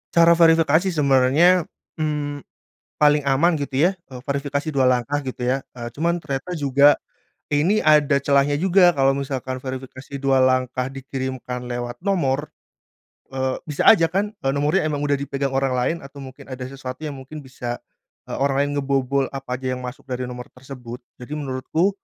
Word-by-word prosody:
Cara 170 0 +6
verifikasi 165 +1 +4
sebenarnya, 150 +4 +4 0.3
mmm, 150 -2 -3 0.6
paling 150 -1 +4
aman 140 +5 +3
gitu 140 -3 -3
ya, - - +1 0.2
eee, 125 - -8
verifikasi 140 +2 -2
2 135 - +3
langkah 130 +3 +1
gitu 130 -1 -6
ya, 130 +2 0
eee, 120 -1 -7
cuman 170 +3 0
ternyata 145 +2 -5
juga 145 -3 +4 0.5
ini 165 +9 +2
ada 150 -2 +4
celahnya 140 0 +3
juga, 180 +2 +4
kalau 135 0 +2
misalkan 130 -2 -4
verifikasi 130 +1 -8
2 135 -1 +3
langkah 130 0 +1
dikirimkan 130 -2 -5
lewat 120 0 -5
nomor, 150 -7 +1 0.9
eee, 130 0 -1
bisa 150 -3 +4
aja 165 -7 +5
kan, 195 +5 -1
eee, 135 - -1
nomornya 150 +5 +1
emang 145 -2 -2
udah 145 -1 +1
dipegang 140 0 -2
orang 135 -1 0
lain 125 +6 0
atau 140 -2 -11
mungkin 135 +1 -11
ada 130 -1 -7
sesuatu 130 +1 -7
yang 145 -3 -5
mungkin 145 +3 -9
bisa, 125 -2 -6 0.5
eee, - - -3
orang 140 0 +2
lain 145 - -1
ngebobol 135 -1 0
apa 130 -2 -4
aja 130 -1 -2
yang 125 - -7
masuk 125 +2 -8
dari 125 -1 -4
nomor 125 0 -7
tersebut. 125 -2 -10 0.2
Jadi 125 +4 -7
menurutku 150 +5 -1
140 Hz, 165 wpm, -22 LUFS, 130-150 Hz, 0.9 s, Cara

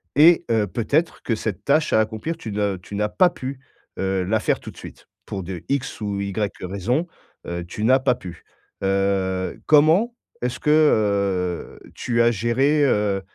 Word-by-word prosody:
et 165 +4 +6
heu, 110 -3 +2
peut-être 145 - -1
que 115 - -1
cette 105 -4 -4
tâche 150 +2 +2
à 110 - +5
accomplir 110 +10 -2
tu 115 -9 -7
n'as 100 -2 -1
tu 90 +3 -10
n'as 105 +1 0
pas 180 - +4
pu, 135 -5 -7 0.4
heu, 95 -1 0
la 110 +4 +1
faire - - 0
tout - - -9
de - - -21
suite, - - -12 0.2
pour 95 - -5
de 90 -1 -7
X 140 -2 -2
ou 100 -1 -2
Y 100 +1 -2
raison, 115 - -1 0.4
heu, 85 0 -4
tu 105 +5 -6
n'as 130 +2 +5
pas 130 -1 +2
pu. 90 -7 -10 0.4
Heu, 95 -1 0
comment 160 +11 +4 0.3
est-ce 125 0 -2
que, - - 0
heu, 100 - +1 0.2
tu 120 -1 0
as 120 0 +4
géré, 130 +7 +2
heu, 105 -5 +1
110 Hz, 180 wpm, -22 LUFS, 95-140 Hz, 0.4 s, et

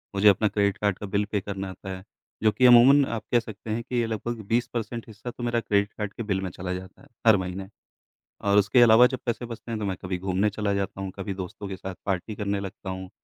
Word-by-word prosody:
मुझे 100 +1 +4
अपना 105 +2 +3
credit 100 -1 +1
card 100 -3 0
का 105 - -5
बिल 100 +1 0
पे 105 - 0
करना 95 -1 -5
होता 95 +1 -9
है, 95 - -13 0.4
जो 110 - +5
कि 130 +4 +2
अमूमन 130 +4 +8
आप 115 -3 -4
कह 120 - +5
सकते 110 -1 -9
हैं 115 +2 -1
कि 125 - -6
ये 115 - -1
लगभग 115 +1 -3
20 120 +2 +2
परसेंट 115 0 -4
हिस्सा 110 +2 -8
तो 120 - -9
मेरा 120 0 +1
क्रेडिट 100 -2 0
कार्ड 105 -2 -4
के 115 - -5
बिल 100 -3 -1
में 95 - -3
चला 90 +2 -4
जाता 95 0 -8
है - - -17 0.2
हर 110 -2 +8
महीने। 95 +1 -5 0.7
और 100 0 +3
उसके 105 +5 +5
अलावा 120 +1 +8
जब 130 - -2
पैसे 120 0 -1
बचते 115 0 -9
हैं 110 - -2
तो 105 - -2
मैं 95 -2 -2
कभी 90 -1 -3
घूमने 95 +3 0
चला 105 -1 -1
जाता 100 0 -3
हूँ, 95 -1 -4
कभी 95 0 -3
दोस्तों 95 +2 -6
के 95 - -5
साथ 95 0 -6
पार्टी 95 +3 -2
करने 100 -1 -2
लगता 95 -1 -7
हूँ, 95 0 -6
105 Hz, 260 wpm, -26 LUFS, 95-115 Hz, 0.7 s, अमूमन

